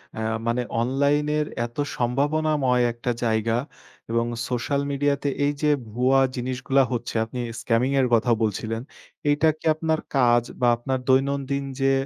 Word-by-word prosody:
অ্যা 110 - -4 0.3
মানে 120 +1 +1 0.2
অনলাইনের 145 +4 +1 0.2
এত 120 +3 -11 0.2
সম্ভাবনাময় 135 0 +1
একটা 120 +1 -3
জায়গা 110 0 +1 0.6
এবং 115 0 +1 0.2
সোশ্যাল 130 +3 -1
মিডিয়া 140 0 +1
তে 140 - +1 0.2
এই 145 - +1
যে 150 - +3 0.2
ভুয়া 130 +3 +3 0.2
জিনিসগুলা 130 +2 +1
হচ্ছে 120 -1 -3
আপনি 125 +2 -7 0.2
স্ক্যামিং 120 +3 +1
এর 125 - +2
কথাও 115 +1 +4
বলছিলেন। 110 +2 -2 0.5
এইটা 150 +2 +3
কি - - -15
আপনার 160 0 0 0.2
কাজ 120 -2 +4 0.2
বা 120 - +4
আপনার 130 +2 -2
দৈনন্দিন 140 +1 +1 0.2
যে 135 0 +3
130 Hz, 145 wpm, -24 LUFS, 120-140 Hz, 0.6 s, কথাও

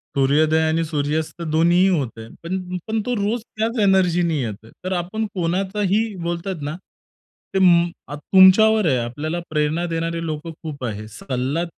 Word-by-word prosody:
सूर्योदय 150 +4 +3
आणि 160 +1 +1
सूर्यास्त 155 +2 -2
दोन्हीही 170 +3 +3
होतंय. 125 -10 -2 0.2
पण, 180 +1 -4
पण 220 0 0
तो 250 - -1
रोज 215 +3 -1
त्याचं 225 +1 -1
एनर्जीने 175 -4 +3
येतो. 110 -2 -6
तर 185 - -3
आपण 185 +5 -2
कोणाचाही 195 +4 0
बोलतात 170 0 -3
ना 150 - -4 0.8
ते 190 - +2
म 170 -1 +6 0.3
तुमच्यावर 195 +6 +5
आहे, 130 -4 +3
आपल्याला 145 +8 -3
प्रेरणा 155 +2 0
देणारे 165 0 -2
लोकं 155 +1 -4
खूप 150 -4 -7
आहेत. 110 -2 -5
सल्ला 130 +7 -3
170 Hz, 145 wpm, -21 LUFS, 150-190 Hz, 0.8 s, म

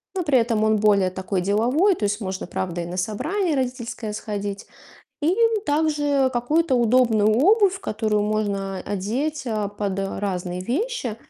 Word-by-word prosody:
но 370 - 0
при 290 -5 +3
этом 230 -2 +1
он 220 - +3
более 205 -3 +3
такой 185 0 -3
деловой. 245 - +2
То 220 - -7
есть 205 +2 0
можно, 190 -1 -4
правда, 175 -1 -3
и - - -4
на 175 +2 -6
собрание 300 - -1
родительское 245 -4 -3
сходить, 205 -1 -5 0.5
и 330 +5 +2 0.3
также 290 -3 +2
какую-то 295 +6 +1
удобную 235 -3 +3
обувь, 385 - +4
которую 215 - -1
можно 200 -2 -2
одеть, 260 +11 -2
а, 215 -3 -1
под 200 -1 -3
разные 185 -2 -3
вещи. 255 - -2
220 Hz, 150 wpm, -23 LUFS, 200-285 Hz, 0.5 s, обувь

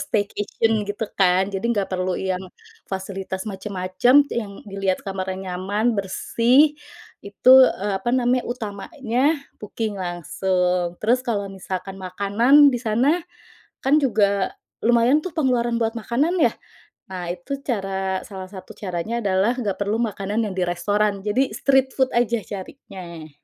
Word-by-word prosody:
staycation, 215 -1 -1 0.2
gitu 205 +2 -2
kan, 190 +1 +3
jadi 195 +2 -4
nggak 205 -5 0
perlu 185 0 -1
yang 185 -1 -2 0.5
fasilitas 190 0 -5
macem-macem, 200 +6 +2
yang 205 -4 -4
dilihat 195 -2 -2
kamarnya 190 -1 -3 0.2
nyaman, 205 +6 0
bersih, 240 +9 +3 0.5
itu, 200 +5 +3 0.3
eee, 205 0 -1
apa 215 - -3
namanya, 250 0 +2
utamanya 240 - -3 0.4
booking 210 -1 -4
langsung. 180 0 -1
Terus 240 +4 +3
kalau 210 -6 -2
misalkan 190 0 -6
makanan 205 +10 +4
di 245 - -1
sana, 255 +9 +2 0.6
kan 275 +3 +4
juga 200 -7 +1 0.3
lumayan 240 +5 +4
tuh 370 - -5
pengeluaran 245 -5 +1
buat 225 0 +1
makanan 280 +11 0
ya. - - +4 0.5
Nah, 180 -3 -5
itu 270 +11 -5
cara 195 -5 -2
salah 190 -2 -8
satu 190 -2 -10
caranya 205 +5 -3
adalah 200 +4 +2
nggak 200 -4 -2
perlu 205 +2 0
makanan 210 0 -2
yang 205 -3 -3
di 180 - +1
restoran, 200 +3 0
jadi 245 +6 0
street 265 -1 +2
food 260 -1 +1
aja 235 -2 +1
carinya. 185 - -9
205 Hz, 135 wpm, -22 LUFS, 190-240 Hz, 0.6 s, makanan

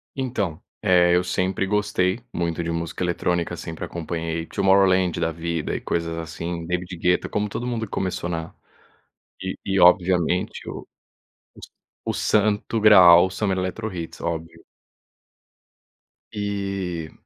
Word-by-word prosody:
Então. 105 - -2 0.2
Eh, 90 -2 +5
eu 90 - +3
sempre 95 +1 -1
gostei 100 -1 0
muito 85 0 -2
de 85 - -3
música 85 +2 -3
eletrônica. 85 0 -1
Sempre 80 -1 -6
acompanhei 80 -1 -4
Tomorrowland 95 -2 +3
da 80 - 0
vida, 85 -1 -3
e - - -4
coisas 85 -1 -2
assim, 85 +1 -5
David 90 +1 -3
Guetta. 90 +2 +1
Como 105 0 -1
todo 120 +4 -4
mundo 115 -2 -2
que 100 - -17
começou 90 -2 -2
na 80 -1 -4 0.9
e - - -3
e, 95 0 0
obviamente, 90 0 +3
o - - -7 0.7
o - - -18
S - - -12 0.3
o - - -1 0.3
Santo 105 +2 0
Graal, 95 -5 +8
o - - -6
Summer 95 0 -1
EletroHits, 95 -2 -4
óbvio. 80 -1 -5 1.7
E 100 -5 -3
90 Hz, 135 wpm, -23 LUFS, 85-100 Hz, 1.7 s, Graal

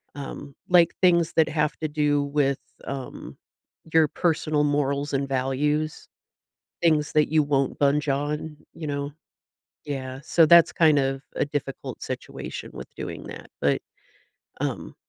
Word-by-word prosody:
um, 140 0 -8
like, 175 -2 +5
things 170 -3 +4
that 160 -1 +4
have 150 -1 0
to 155 - -1
do 145 -1 +1
with, 140 -1 +1 0.3
um, 135 -2 -7 0.6
your 160 -1 +6
personal 155 -1 0
morals 145 0 0
and 135 0 0
values, 145 +4 -1 0.8
things 155 -3 +2
that 150 0 +3
you 155 - +5
won't 140 -2 0
budge 145 +1 +2
on, 150 +2 -3 0.2
you 160 -1 -6
know? 140 0 -3 0.7
Yeah. 130 -2 -5
So, 165 +1 +4
that's 170 +1 +7
kind 155 -3 +4
of 135 0 -1
a - - +2
difficult 145 -2 -5
situation - - -6
with - - -10
doing - - -6
that. - - -9
But, - - +2 0.8
um, - - -3
145 Hz, 140 wpm, -25 LUFS, 140-155 Hz, 0.8 s, that's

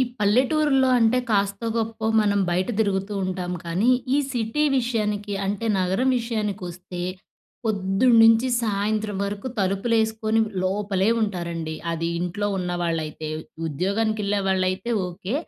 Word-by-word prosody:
ఈ - - +5 0.2
పల్లెటూరులో 265 +5 +3
అంటే 230 +2 +3
కాస్తో 200 +1 0
గొప్పో 225 -1 -2 0.2
మనం 205 -1 +2
బయట 180 +2 0
తిరుగుతూంటాం 190 -3 -1
కానీ! 185 +9 +1 0.2
ఈ - - +4 0.2
సిటీ 240 +5 0
విషయానికి 210 -4 -1
అంటే 205 +3 -2
నగరం 190 +8 +1
విషయానికి 215 -4 -3
వస్తే 180 0 -8 0.6
పొద్దున్నుంచి 225 +4 +4
సాయంత్రం 210 0 -1
వరకు 200 +3 -4
తలుపులేసుకొని 220 +3 +1 0.2
లోపలే 195 0 0
ఉంటారండి. 170 -5 -3 0.2
అది 165 0 -2
ఇంట్లో 180 +4 -2
ఉన్నవాళ్ళైతే. 165 -4 -2 0.4
ఉద్యోగానికేళ్ళే 200 +5 0
వాళ్ళులైతే 185 +4 0 0.2
ఓకే. 185 +5 -5
205 Hz, 110 wpm, -24 LUFS, 185-225 Hz, 0.6 s, ఈ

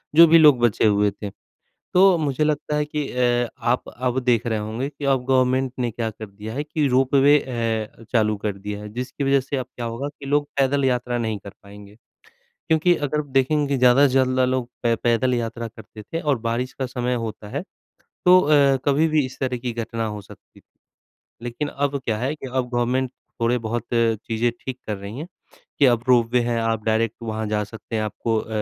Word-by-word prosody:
जो 165 +1 +9
भी 165 +1 +7
लोग 150 -5 +7
बचे 120 -3 +2
हुए 105 -1 +3
थे। 100 +1 -7 0.6
तो 185 0 +6
मुझे 150 -2 0
लगता 150 0 -1
है 150 0 +1
कि 150 -1 -3
अ, 120 -1 +1 0.2
आप 125 +1 0
अब 125 +1 -2
देख 120 -2 +2
रहे 110 -2 0
होंगे 110 +6 -3
कि 145 0 -8
अब 135 -2 +1
गवर्नमेंट 130 0 +2
ने 120 -1 0
क्या 115 0 -3
कर 110 0 -9
दिया 105 +3 -8
है 145 +4 -2
कि 150 -1 -1
रोपवे 135 +3 +4
अ, 115 -4 -3
चालू 110 -3 +2
कर 105 -2 -2
दिया 105 +1 -6
है 105 - -8
जिसकी 125 +4 -4
वजह 135 0 +3
से 135 +2 -4
अब 130 - -3
क्या 120 - -5
होगा 115 +4 -4
कि 145 -1 -13
लोग 145 +1 +1
पैदल 140 0 +2
यात्रा 125 -1 0
नहीं 110 -3 -2
कर 100 0 -11
पाएँगे। 100 0 -13 0.7
क्योंकि 160 +2 +4
अगर 150 +2 -1
देखेंगे 140 +1 +2
ज़्यादा 125 +3 +6
से 130 - -1
ज़्यादा 130 -1 +3
लोग 130 -1 -1
पै 120 -1 +2
पैदल 120 +2 +1
यात्रा 115 0 -3
करते 110 -1 -13
थे 165 +11 -5
और 145 -5 0
बारिश 120 +3 -1
का 135 - -4
समय 125 0 -2
होता 105 -1 -7
है, - - -4 0.6
तो 180 +1 +7
अ, 145 -4 +4
कभी 145 +3 +3
भी 155 -2 +2
इस 130 - -12
तरह 130 -2 -1
की 120 0 -4
घटना 115 0 -3
हो 105 -1 -5
सकती। - - -17 0.8
लेकिन 120 +5 -4
अब 140 0 -1
क्या 110 -2 0
है 130 +6 -1
कि 140 - -8
अब 130 -1 -2
गवर्नमेंट 125 +1 0 0.3
थोड़े 120 +2 +2
बहुत 120 +1 -3
चीज़ें 115 0 +1
ठीक 130 -1 -6
कर 105 - -2
रही 100 +4 -8
हैं, 160 - -6 0.5
कि 145 - +6
अब 120 -2 +3
रोपवे 125 -1 +4
है, 120 0 -1
आप 115 -1 -1
डायरेक्ट 110 0 0
वहाँ 110 -1 -3
जा 105 0 0
सकते 110 +1 -8
हैं, 110 - 0
आपको 110 +1 -2
अ, - - -8
125 Hz, 210 wpm, -22 LUFS, 115-140 Hz, 0.8 s, जो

